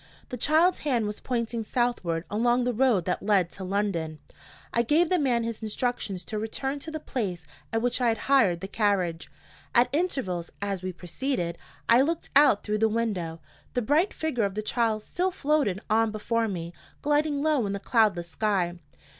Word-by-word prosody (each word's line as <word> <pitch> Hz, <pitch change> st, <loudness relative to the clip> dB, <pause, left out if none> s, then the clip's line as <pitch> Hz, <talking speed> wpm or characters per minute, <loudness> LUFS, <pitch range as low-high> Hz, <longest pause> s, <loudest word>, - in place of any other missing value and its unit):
The -, -, -4 dB
child's 315 Hz, +8 st, +3 dB
hand 250 Hz, -7 st, 0 dB
was 210 Hz, 0 st, -5 dB
pointing 235 Hz, -2 st, -2 dB
southward, 215 Hz, -9 st, -1 dB
along 240 Hz, +4 st, +2 dB
the 245 Hz, 0 st, 0 dB
road 230 Hz, -7 st, +3 dB
that 180 Hz, -, -1 dB
led 195 Hz, -4 st, +2 dB
to 195 Hz, -, -8 dB
London. 185 Hz, -5 st, -1 dB, 0.6 s
I 235 Hz, -, +3 dB
gave 310 Hz, +8 st, +3 dB
the 365 Hz, -, +3 dB
man 245 Hz, -5 st, +2 dB
his 230 Hz, -1 st, -4 dB
instructions 215 Hz, -4 st, -2 dB
to 215 Hz, -, -4 dB
return 270 Hz, +6 st, -3 dB
to 320 Hz, -, -7 dB
the 315 Hz, 0 st, -4 dB
place 190 Hz, -, -3 dB, 0.3 s
at 225 Hz, 0 st, 0 dB
which 245 Hz, +1 st, 0 dB
I 245 Hz, -, +3 dB
had 225 Hz, -1 st, +2 dB
hired 215 Hz, -11 st, +3 dB
the 195 Hz, -, -4 dB
carriage. 195 Hz, -6 st, 0 dB, 0.5 s
At 240 Hz, +1 st, +5 dB
intervals, 260 Hz, -, -1 dB
as 200 Hz, -2 st, -2 dB
we 185 Hz, 0 st, -3 dB
proceeded, 175 Hz, +1 st, -3 dB, 0.3 s
I 235 Hz, +2 st, +6 dB
looked 325 Hz, +4 st, -1 dB
out 280 Hz, -8 st, +6 dB
through 210 Hz, 0 st, -1 dB
the 220 Hz, 0 st, +3 dB
window. 190 Hz, -8 st, -2 dB, 0.3 s
The 245 Hz, -, +1 dB
bright 310 Hz, -, +3 dB
figure 310 Hz, -8 st, -1 dB
of 200 Hz, -1 st, -3 dB
the 215 Hz, -, -2 dB
child 220 Hz, -1 st, 0 dB
still 365 Hz, +9 st, -1 dB
floated 295 Hz, -, +1 dB
on 225 Hz, +1 st, +3 dB
before 225 Hz, +2 st, -1 dB
me 170 Hz, -4 st, -5 dB, 0.3 s
gliding 295 Hz, 0 st, +1 dB
low 300 Hz, -8 st, +2 dB
in 200 Hz, -, -2 dB
the 200 Hz, -, -3 dB
cloudless 205 Hz, -5 st, +2 dB
sky. 180 Hz, -3 st, 0 dB
225 Hz, 185 wpm, -27 LUFS, 195-265 Hz, 0.6 s, I